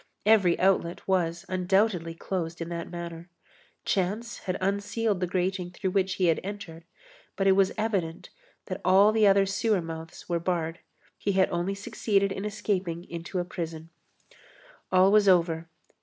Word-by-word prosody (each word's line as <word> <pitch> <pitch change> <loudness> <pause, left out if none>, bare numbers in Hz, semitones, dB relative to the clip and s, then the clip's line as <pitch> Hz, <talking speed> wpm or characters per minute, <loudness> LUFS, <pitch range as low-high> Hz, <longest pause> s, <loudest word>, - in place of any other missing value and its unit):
Every 205 -5 +4
outlet 180 -2 +1
was, 175 -2 0
undoubtedly, 185 -2 +1
closed 170 -2 -4
in 165 0 -4
that 170 -1 -5
manner. 170 0 -7 0.6
Chance 205 +5 -1
had 185 - -1
unsealed 200 +2 0
the 180 - -1
grating 185 0 -1
through 185 +1 -3
which 190 0 +1
he 185 - +1
had 165 -2 +3
entered, 180 -5 -7 0.5
but 195 - -1
it 195 - +6
was 190 0 +4
evident 195 -7 -2 0.3
that - - -5
all 195 +3 +6
the 215 -1 +4
other 195 0 +5
sewer 200 +1 +1
mouths 165 -1 -8
were 170 -1 0
barred. 165 -1 -2 0.4
He 200 - 0
had 190 0 +3
only 175 +3 -1
succeeded 200 0 0
in 195 +1 -4
escaping 195 -5 -2
into 170 +2 -5
a 175 - 0
prison. 165 -2 -6 1.0
All 185 +1 +5
was 210 -1 +5
over. 165 -2 +2
185 Hz, 155 wpm, -27 LUFS, 170-195 Hz, 1.0 s, it